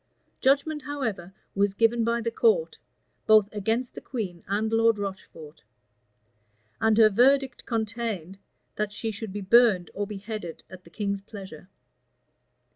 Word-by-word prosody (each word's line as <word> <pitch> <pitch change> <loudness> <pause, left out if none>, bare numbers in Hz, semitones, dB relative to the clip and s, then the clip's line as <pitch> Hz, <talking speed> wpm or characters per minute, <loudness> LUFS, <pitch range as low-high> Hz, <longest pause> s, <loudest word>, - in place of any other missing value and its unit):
Judgment, 285 +3 +2
however, 225 -11 -4 0.2
was 200 0 +1
given 230 +2 +2
by 235 +1 0
the 230 0 -2
court, 470 - +1 0.5
both 215 -2 +6
against 225 +4 -1
the - - -9
queen 190 -9 -5
and 215 +3 -1
Lord 225 -1 +4
Rocheford; 180 -6 -8 1.2
and 220 -1 +3
her 220 -1 +7
verdict 265 +5 +2
contained, 220 -5 -3 0.4
that 210 -1 -1
she 225 +1 -4
should 215 0 -7
be 205 +1 -5
burned 200 -3 +4
or 205 0 -3
beheaded 205 -4 -7
at 185 -1 -12
the - - -15
king's 200 +2 -3
pleasure. 195 -4 -11
215 Hz, 135 wpm, -26 LUFS, 195-235 Hz, 1.2 s, her